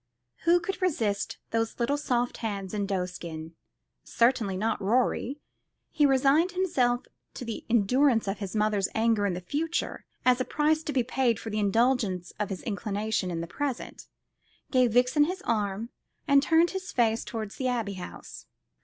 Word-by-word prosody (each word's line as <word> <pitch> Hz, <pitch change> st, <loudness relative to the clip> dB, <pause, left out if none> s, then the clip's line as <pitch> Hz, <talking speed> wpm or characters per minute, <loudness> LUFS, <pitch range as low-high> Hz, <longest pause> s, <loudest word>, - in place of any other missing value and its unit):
Who 345 Hz, +1 st, +5 dB
could 380 Hz, +2 st, -4 dB
resist 225 Hz, -, 0 dB
those 225 Hz, +1 st, -1 dB
little 245 Hz, +4 st, +1 dB
soft 245 Hz, -4 st, -1 dB
hands 200 Hz, -4 st, -4 dB
in 205 Hz, -2 st, -1 dB
doeskin? 180 Hz, -4 st, -4 dB, 0.5 s
Certainly 230 Hz, -5 st, +1 dB
not 215 Hz, +2 st, -1 dB
Rorie. 245 Hz, +5 st, +1 dB, 0.5 s
He 295 Hz, -1 st, +4 dB
resigned 280 Hz, +6 st, +3 dB
himself 255 Hz, -10 st, +1 dB, 0.3 s
to 250 Hz, -, -6 dB
the 230 Hz, -, -6 dB
endurance 235 Hz, +2 st, +3 dB
of 195 Hz, -, -2 dB
his 200 Hz, 0 st, -5 dB
mother's 210 Hz, -2 st, +2 dB
anger 220 Hz, -2 st, +2 dB
in 185 Hz, -, -1 dB
the 180 Hz, -, -5 dB
future 315 Hz, -, -2 dB, 0.2 s
as 255 Hz, 0 st, +4 dB
a -, -, +3 dB
price 305 Hz, +3 st, +1 dB
to -, -, -1 dB
be 260 Hz, -4 st, +2 dB
paid 245 Hz, -2 st, +1 dB
for 225 Hz, -, -6 dB
the 215 Hz, -, -1 dB
indulgence 210 Hz, -3 st, +1 dB
of 210 Hz, -, -1 dB
his 190 Hz, -2 st, -5 dB
inclination 210 Hz, -2 st, -2 dB
in 165 Hz, -2 st, -3 dB
the -, -, -3 dB
present, 270 Hz, +7 st, -4 dB, 0.6 s
gave 250 Hz, -4 st, +3 dB
Vixen 250 Hz, +5 st, +4 dB
his 370 Hz, +3 st, -4 dB
arm, 210 Hz, 0 st, -1 dB, 0.4 s
and 280 Hz, -1 st, +6 dB
turned 325 Hz, +3 st, +3 dB
his 380 Hz, -1 st, -5 dB
face 230 Hz, -2 st, +2 dB
towards 215 Hz, -3 st, -6 dB
the 260 Hz, -, -1 dB
Abbey 230 Hz, -5 st, -1 dB
House. 180 Hz, -2 st, -9 dB
230 Hz, 165 wpm, -28 LUFS, 205-275 Hz, 0.6 s, and